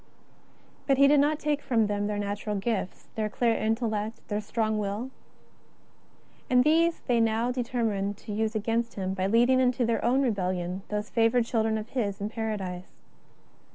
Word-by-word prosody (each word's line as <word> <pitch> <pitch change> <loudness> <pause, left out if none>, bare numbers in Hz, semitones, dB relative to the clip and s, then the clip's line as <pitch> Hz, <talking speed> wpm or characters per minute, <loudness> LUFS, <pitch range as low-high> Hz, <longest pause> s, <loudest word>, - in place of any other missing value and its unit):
But 275 -2 +3
He 275 +1 +7
did 290 0 +5
not 295 +2 +3
take 300 -1 -1
from 230 -4 +2
them 205 0 -1
their 210 0 -2
natural 205 +1 -3
gifts, 200 -2 -3
their 215 -1 -2
clear 230 +2 +1
intellect, 220 -1 -2
their 210 0 -1
strong 215 0 -1
will. 210 +5 -3 1.4
And 250 0 +5
these 330 +3 +3
they 240 -2 +1
now 225 +2 +1
determined 230 -6 -1
to 210 - -9
use 220 +1 -1
against 230 +2 -1
Him 190 -1 -2
by 190 0 -1
leading 240 +5 +4
into 250 -1 +2
their 230 0 0
own 260 +4 +3
rebellion 185 -5 -1
those 210 0 -3
favoured 230 +1 +3
children 220 -2 0
of 215 +1 -6
His 210 -6 -2
in 205 +1 -3
Paradise. 200 -5 -4
220 Hz, 165 wpm, -27 LUFS, 205-245 Hz, 1.4 s, He